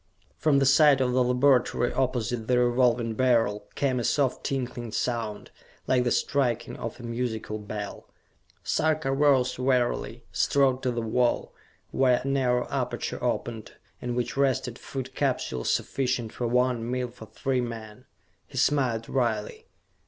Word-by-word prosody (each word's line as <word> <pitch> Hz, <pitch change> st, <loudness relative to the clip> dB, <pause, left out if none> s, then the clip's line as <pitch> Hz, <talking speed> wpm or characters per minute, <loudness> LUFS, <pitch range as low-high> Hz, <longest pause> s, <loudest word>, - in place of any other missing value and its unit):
From 150 Hz, -3 st, +2 dB
the 135 Hz, -, +3 dB
side 140 Hz, 0 st, +6 dB
of 130 Hz, -1 st, +1 dB
the 125 Hz, 0 st, +3 dB
laboratory 125 Hz, -1 st, +2 dB
opposite 120 Hz, -3 st, -1 dB
the 125 Hz, -, +3 dB
Revolving 120 Hz, -1 st, +2 dB
Beryl 115 Hz, -4 st, +1 dB
came 130 Hz, -3 st, 0 dB
a -, -, -2 dB
soft 135 Hz, +1 st, +1 dB
tinkling 125 Hz, -4 st, -3 dB
sound, 115 Hz, -3 st, -3 dB, 0.3 s
like 125 Hz, -1 st, +2 dB
the -, -, +2 dB
striking 120 Hz, -4 st, 0 dB
of 115 Hz, +1 st, -6 dB
a -, -, -10 dB
musical 115 Hz, -2 st, -3 dB
bell. 105 Hz, 0 st, -7 dB, 0.5 s
Sarka 155 Hz, -3 st, +1 dB
rose 135 Hz, -3 st, +3 dB
wearily, 125 Hz, -2 st, 0 dB
strode 135 Hz, -2 st, +2 dB
to 130 Hz, -, 0 dB
the 120 Hz, -1 st, -2 dB
wall, 120 Hz, +2 st, 0 dB, 0.4 s
where 130 Hz, -2 st, +3 dB
a -, -, -4 dB
narrow 125 Hz, -3 st, +1 dB
aperture -, -, -3 dB
opened, 115 Hz, -2 st, -3 dB, 0.3 s
in 120 Hz, -1 st, -3 dB
which 120 Hz, -1 st, -2 dB
rested 130 Hz, -3 st, 0 dB
Food 135 Hz, -2 st, -6 dB
Capsules 65 Hz, -1 st, -1 dB
sufficient 125 Hz, -4 st, -1 dB
for 120 Hz, -, -2 dB
one 125 Hz, -1 st, +1 dB
meal 125 Hz, 0 st, -2 dB
for 110 Hz, -2 st, -12 dB
three 130 Hz, +2 st, -1 dB
men. 110 Hz, -3 st, -7 dB, 0.4 s
He -, -, -10 dB
smiled 125 Hz, -6 st, +1 dB
wryly. 115 Hz, -5 st, -2 dB
125 Hz, 145 wpm, -27 LUFS, 115-130 Hz, 0.5 s, side